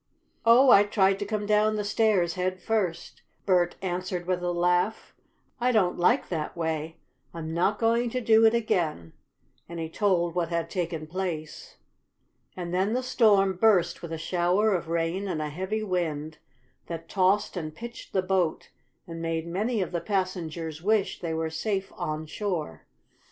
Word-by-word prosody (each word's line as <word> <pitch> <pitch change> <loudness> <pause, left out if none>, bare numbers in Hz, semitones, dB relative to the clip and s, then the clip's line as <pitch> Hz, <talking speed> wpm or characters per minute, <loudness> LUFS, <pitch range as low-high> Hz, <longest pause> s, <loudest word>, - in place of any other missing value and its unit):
"Oh, 250 +3 +7
I 200 - +8
tried 195 -2 +2
to 205 - -3
come 210 -1 -2
down 210 +1 +3
the 210 - -1
stairs 205 -5 +2
head 185 +1 -2
first," 185 -5 -2 0.2
Bert 180 -3 +2
answered 180 -1 -3
with 180 0 -1
a 175 0 -1
laugh. 180 +5 0 0.5
"I 250 +1 +2
don't 195 -6 +2
like 235 +10 +3
that 160 -1 -4
way. 160 -1 -3 0.4
I'm 160 -1 -5
not 185 +5 +1
going 235 +2 +2
to 255 - -2
do 225 -2 +4
it 220 - +3
again," 160 - -1 0.6
and 170 -1 -6
he 160 -1 -4
told 175 -2 +1
what 170 -2 -1
had 170 -1 -2
taken 165 -4 -3
place. 160 -2 -5 0.8
And 175 -1 -5
then 190 +4 +1
the 255 +1 0
storm 200 -7 +3
burst 180 -5 +3
with 170 - -7
a 165 - -3
shower 180 +6 +1
of 170 -3 -2
rain 170 +4 -1
and 170 -5 -2
a 150 -1 -2
heavy 190 +8 -3
wind 160 -5 -2 0.5
that 165 -1 -6
tossed 195 +3 +1
and 155 -3 -5
pitched 235 +4 -9
the 190 - +1
boat, 185 -4 -1 0.3
and 165 -1 -7
made 165 -1 -2
many 205 +5 -1
of 180 - -7
the 170 -2 -2
passengers 170 -5 -3
wish 210 +2 +1
they 165 -2 -3
were 160 0 -2
safe 195 +3 -2
on 155 +1 -3
shore. 165 - -4
180 Hz, 170 wpm, -27 LUFS, 165-205 Hz, 0.8 s, I